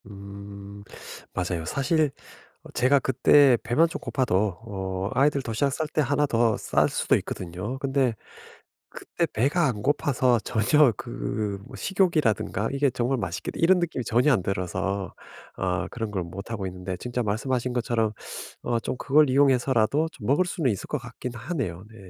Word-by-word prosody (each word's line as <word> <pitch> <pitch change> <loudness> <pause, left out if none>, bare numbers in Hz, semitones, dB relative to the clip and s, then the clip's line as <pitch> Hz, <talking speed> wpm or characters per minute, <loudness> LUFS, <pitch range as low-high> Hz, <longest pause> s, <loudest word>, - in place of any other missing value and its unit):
음. 100 0 -10 0.5
맞아요. 90 -2 -2
사실 150 - +1 0.5
어 - - -13
제가 130 +3 +4
그때 130 0 +5
배만 155 +8 +3
좀 - - -5
고파도 105 -7 0
어 95 -2 -3
아이들 140 +1 +3
도시락 125 +5 0
쌀 155 +2 -2
때 150 - 0
1 145 +1 +2
더 115 -4 +2
쌀 - - +1
수도 - - +2
있거든요. 90 +8 -5
근데 135 -3 +1 0.8
그때 - - -3
배가 145 +9 +2
안 110 -6 -2
고파서 130 -3 +2
전혀 120 +7 +3
그 100 - -4
뭐 - - -10
식욕이라든가 155 - +1
'이게 140 0 +2
정말 125 +2 -1
맛있겠다.' 90 -5 -4
이런 180 +2 +5
느낌이 165 -8 -2
전혀 120 +6 +3
안 100 - +2
들어서 95 +1 -2 0.4
어 90 -1 -1
그런 115 -3 -4
걸 95 -3 -2
못하고 100 +4 -6
있는데 90 0 -5
진짜 125 0 -3
말씀하신 120 +4 -1
것처럼 115 -3 0 0.5
어 120 - 0
좀 130 - -3
그걸 150 +2 +4
이용해서라도 135 +1 +3
좀 105 - -9
먹을 145 +8 +3
수는 160 -7 0
있을 100 - -6
것 150 - -1
같긴 125 0 -7
하네요. 115 - -4
네. 110 - -15
120 Hz, 315 characters per minute, -26 LUFS, 100-140 Hz, 0.8 s, 그때